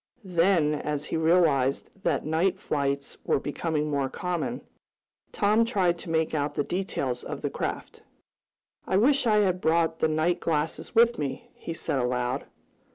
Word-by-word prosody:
Then, 170 -3 +3
as 150 0 -3
he - - -3
realized 160 -1 +2
that - - 0
night 160 +5 +1
flights 140 -1 -2
were - - +1
becoming 150 +1 -2
more 140 -2 0
common, 180 - -3 0.7
Tom 210 +3 +3
tried 185 -7 +1
to - - -9
make 160 -1 0
out 145 -1 -1
the 145 - +1
details 140 -9 -2
of - - -6
the - - -1
craft. - - -5 0.9
"I 190 - +2
wish 265 +4 +3
I 210 -1 +4
had 185 -2 +1
brought 165 0 +2
the - - +3
night 160 +3 +1
glasses 160 +6 -2
with 235 +1 +5
me," 140 -3 -4
he 165 - -7
said 140 - -2
aloud. 125 +1 -1
160 Hz, 160 wpm, -27 LUFS, 145-185 Hz, 0.9 s, with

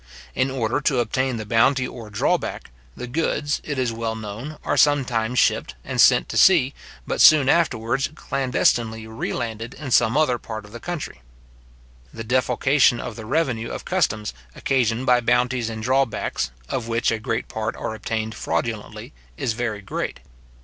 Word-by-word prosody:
In 130 - +1
order 125 0 -1
to 135 -2 +1
obtain 125 +2 0
the 110 - -5
bounty 125 +4 +3
or 115 -4 -9
drawback, 100 -10 -1 0.3
the - - -5
goods, 145 +2 -1
it 145 -3 -4
is 125 -3 0
well 115 0 -3
known, 110 +8 -7
are - - 0
sometimes 125 -5 +2
shipped, 65 - +2
and - - +1
sent - - +5
to - - -3
sea, 145 -8 +5 0.3
but - - -1
soon 150 -4 +7
afterwards 130 -5 +1
clandestinely 120 -5 0
re 110 +1 -4
landed 115 -1 -4
in 140 -3 -7
some 120 +2 +4
other 130 -6 +2
part 110 -2 -7
of 105 - -15
the 120 - -8
country. 165 - -6 0.9
The 115 - -7
defalcation 130 +1 +2
of 115 - -6
the 110 -2 -9
revenue 125 -5 0
of - - -6
customs 105 0 0 0.2
occasioned 125 -2 0
by 125 -1 +4
bounties 125 0 +1
and 110 -1 -6
drawbacks, 130 - 0 0.2
of 115 - -3
which 115 0 +1
a 110 - -1
great 110 +1 -2
part 110 +1 -3
are - - -4
obtained 110 0 -3
fraudulently, - - -4 0.2
is 115 - -1
very 110 -3 -3
great. 95 - -4
120 Hz, 165 wpm, -23 LUFS, 110-130 Hz, 0.9 s, soon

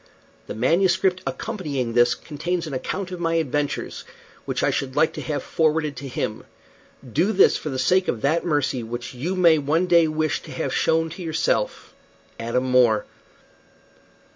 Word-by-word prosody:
The - - -6
MS. 170 - +3 0.3
accompanying 145 - -3
this 120 0 +4
contains 170 +3 -3
an 155 - -6
account 185 +8 -4
of 180 - -6
my 165 -1 0
adventures, 145 -2 -2 0.4
which - - -2
I - - +3
should 135 -1 -3
like 160 - +3
to - - -6
have 150 -2 -3
forwarded 155 -2 0
to 140 - -6
him. 110 -4 -3 0.6
Do 165 - +1
this 195 -2 +5
for 155 - -4
the 130 - -3
sake 180 +8 +2
of 110 - -2
that 160 +4 +1
mercy 145 -6 0
which 120 +3 -6
you 155 +10 -3
may 170 -4 +5
one 155 +5 +1
day 170 -2 +5
wish 155 -1 -1
to - - -11
have - - -3
shown 165 0 +1
to 180 - -8
yourself. 160 -2 -1 0.5
"ADAM 115 +2 -1
MORE." 125 -4 +3
155 Hz, 165 wpm, -23 LUFS, 130-170 Hz, 0.6 s, this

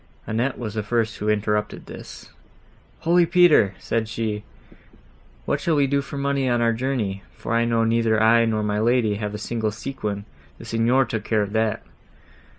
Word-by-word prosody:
Annette 120 +4 -1
was 110 -4 -5
the 110 - -1
first 110 +1 -1
who 105 - -2
interrupted 105 0 -1
this. - - -11 0.7
"Holy 170 +1 +4
Peter!" 160 - +5
said 110 -1 -2
she, 110 -2 -3 1.0
"What - - -1
shall 165 - +1
we 145 -1 +3
do 140 +1 +1
for 140 - -8
money 140 -1 0
on 120 -1 +2
our 115 0 +2
journey? 115 -6 -2
for - - -4
I 115 0 +3
know 115 -1 +2
neither 115 -1 +2
I, 115 +1 +5
nor 110 -1 0
my 105 0 0
lady, 115 -2 +2
have 105 0 -4
a - - -3
single 110 0 -2
sequin; 105 -3 -5 0.3
the - - -11
Signor 115 +4 +2
took 110 -4 -4
care 110 -1 +1
of 100 0 -6
that!" 110 -1 0
115 Hz, 180 wpm, -23 LUFS, 105-125 Hz, 1.0 s, Peter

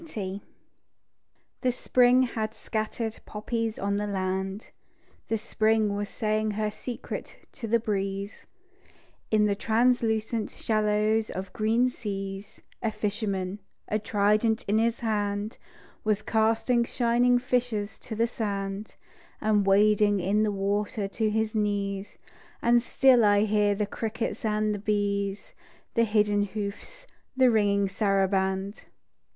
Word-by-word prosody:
GREECE 200 - -5 1.2
The 255 - +2
Spring 250 +1 +4
had 220 -3 -3
scattered 220 0 -3
poppies 225 +1 -3
on 200 +1 -1
the 210 0 -2
land, 190 +1 -3 0.6
The 225 - 0
Spring 220 -1 +1
was 205 0 -3
saying 215 0 0
her 215 -1 0
secret 240 +3 -7
to 240 -5 -7
the 230 +2 +3
breeze; 200 -1 -3 0.8
In 215 -1 +3
the 205 - +2
translucent 225 0 +1
shallows 215 0 +1
of 185 0 -6
green 225 +3 +2
seas, 195 -4 -6 0.2
A 225 - 0
fisherman, 200 -2 -2 0.3
a 215 - +1
trident 215 +2 +2
in 210 +2 +3
his 230 +1 0
hand, 205 -1 -2 0.4
Was 215 -1 0
casting 225 +2 +2
shining 245 +1 +2
fishes 245 -4 -1
to 220 - -7
the 230 +2 +2
sand, 200 -3 -4 0.4
And 210 -2 +2
wading 205 +1 +4
in 195 +4 +1
the 215 -1 +2
water 200 +1 -1
to 220 +1 0
his 220 0 0
knees; 200 -2 -2 0.4
And 235 0 +4
still 250 -1 +4
I 205 -1 +5
hear 210 -1 +2
the 210 +1 0
crickets 220 +1 -4
and 215 -1 +1
the 205 - -4
bees, 200 -1 -1 0.4
The 230 -1 +3
hidden 210 -1 +2
hoofs, 210 - -5 0.3
the 260 -2 +5
ringing 200 -2 +2
saraband. 195 0 0
215 Hz, 125 wpm, -27 LUFS, 200-225 Hz, 1.2 s, I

